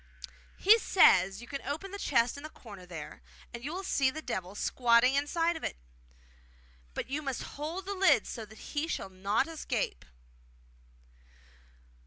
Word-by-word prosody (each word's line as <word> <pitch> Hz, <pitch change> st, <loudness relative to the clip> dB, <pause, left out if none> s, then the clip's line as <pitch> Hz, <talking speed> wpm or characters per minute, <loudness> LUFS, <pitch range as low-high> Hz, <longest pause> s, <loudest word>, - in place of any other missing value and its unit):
'He 440 Hz, +4 st, +6 dB
says 195 Hz, -, +5 dB
you -, -, -11 dB
can 275 Hz, +1 st, -5 dB
open 320 Hz, +7 st, -5 dB
the 400 Hz, -, -6 dB
chest 235 Hz, -8 st, +2 dB
in 285 Hz, -, -8 dB
the 310 Hz, -, -7 dB
corner 200 Hz, -10 st, -12 dB
there, 165 Hz, -4 st, -8 dB, 0.3 s
and 235 Hz, 0 st, -7 dB
you 290 Hz, -, -4 dB
will 370 Hz, +3 st, -4 dB
see 275 Hz, -7 st, +2 dB
the 310 Hz, -, -5 dB
Devil 185 Hz, -4 st, -4 dB
squatting 240 Hz, +3 st, +3 dB
inside 325 Hz, +4 st, 0 dB
it; -, -, -3 dB, 1.2 s
but -, -, -3 dB
you 280 Hz, +4 st, -2 dB
must 270 Hz, -4 st, -3 dB
hold 320 Hz, +6 st, -5 dB
the 400 Hz, -, -3 dB
lid 385 Hz, 0 st, +4 dB
so 230 Hz, -, -6 dB
that 220 Hz, +1 st, -13 dB, 0.2 s
he 300 Hz, +2 st, 0 dB
shall 195 Hz, -, -3 dB
not 195 Hz, +6 st, 0 dB
escape. 255 Hz, -, -3 dB
275 Hz, 160 wpm, -31 LUFS, 215-325 Hz, 1.2 s, He